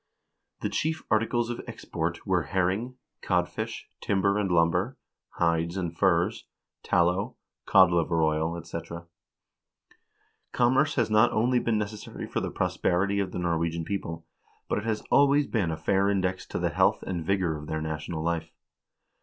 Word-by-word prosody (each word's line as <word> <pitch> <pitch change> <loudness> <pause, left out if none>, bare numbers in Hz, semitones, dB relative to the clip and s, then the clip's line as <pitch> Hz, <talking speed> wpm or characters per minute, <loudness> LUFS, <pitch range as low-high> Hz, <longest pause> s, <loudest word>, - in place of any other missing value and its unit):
x - - -21
The - - 0
chief 160 +1 -1
articles 115 +2 +1
of 120 - -5
export 85 +1 -4
were 95 -3 +2
herring, 95 - -1 0.3
codfish, 105 +6 -2
timber 100 -1 +1
and 100 -2 0
lumber, 90 +8 +2 0.4
hides 85 +1 0
and 85 -3 -3
furs, 95 +4 +1 0.3
tallow, 90 +7 +1 0.3
codliver 85 -3 +4
oil, 80 +2 0
etc. 85 0 -7 1.5
Commerce 130 +5 +3
has 115 -4 +1
not 110 +3 +5
only 125 +3 +2
been 115 -2 0
necessary 105 0 -5
for - - -2
the - - -3
prosperity 100 +3 0
of 95 -2 -1
the - - -5
Norwegian 85 -1 -1
people, 85 -4 -4 0.4
but - - 0
it 105 - -7
has 110 -2 -1
always 140 +1 +5
been 105 -10 0
a 80 - -2
fair 95 +5 +2
index 95 -2 -1
to - - -4
the - - 0
health - - +2
and 90 -3 -3
vigor 90 -2 0
of 75 0 -8
their 80 - -2
national 80 +1 -4
life. 80 -1 -2
95 Hz, 155 wpm, -27 LUFS, 85-110 Hz, 1.5 s, not